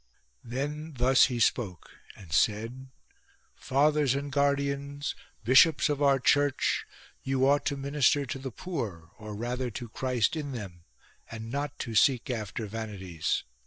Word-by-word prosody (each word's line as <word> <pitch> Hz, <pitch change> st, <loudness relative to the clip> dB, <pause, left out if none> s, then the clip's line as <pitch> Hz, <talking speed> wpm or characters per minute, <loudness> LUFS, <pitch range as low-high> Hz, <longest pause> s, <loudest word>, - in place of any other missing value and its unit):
Then 145 Hz, +5 st, -4 dB
thus 130 Hz, +2 st, +5 dB
he 125 Hz, -3 st, -2 dB
spoke 100 Hz, -6 st, 0 dB, 0.2 s
and 85 Hz, -6 st, -11 dB
said: 115 Hz, +8 st, 0 dB, 0.3 s
— -, -, -35 dB
" -, -, -38 dB
Fathers 145 Hz, 0 st, +2 dB
and 140 Hz, 0 st, -3 dB
guardians, 140 Hz, 0 st, 0 dB, 0.3 s
bishops 135 Hz, +7 st, +5 dB
of 145 Hz, -1 st, -1 dB
our 140 Hz, -1 st, +5 dB
Church, 145 Hz, +1 st, +2 dB, 0.3 s
you 135 Hz, 0 st, +1 dB
ought 145 Hz, +1 st, +3 dB
to 140 Hz, -, -1 dB
minister 140 Hz, 0 st, +2 dB
to 135 Hz, -1 st, -5 dB
the 135 Hz, 0 st, -5 dB
poor, 110 Hz, -, -5 dB
or 105 Hz, -1 st, -7 dB
rather 125 Hz, +3 st, -3 dB
to 120 Hz, +1 st, -7 dB
Christ 125 Hz, +2 st, 0 dB
in 145 Hz, -3 st, -4 dB
them, 90 Hz, -8 st, -8 dB, 0.4 s
and 115 Hz, 0 st, -7 dB
not 140 Hz, +1 st, -3 dB
to 115 Hz, -, -5 dB
seek 125 Hz, +2 st, +3 dB
after 110 Hz, -1 st, -4 dB
vanities. 100 Hz, -6 st, -3 dB
130 Hz, 150 wpm, -28 LUFS, 110-140 Hz, 0.4 s, thus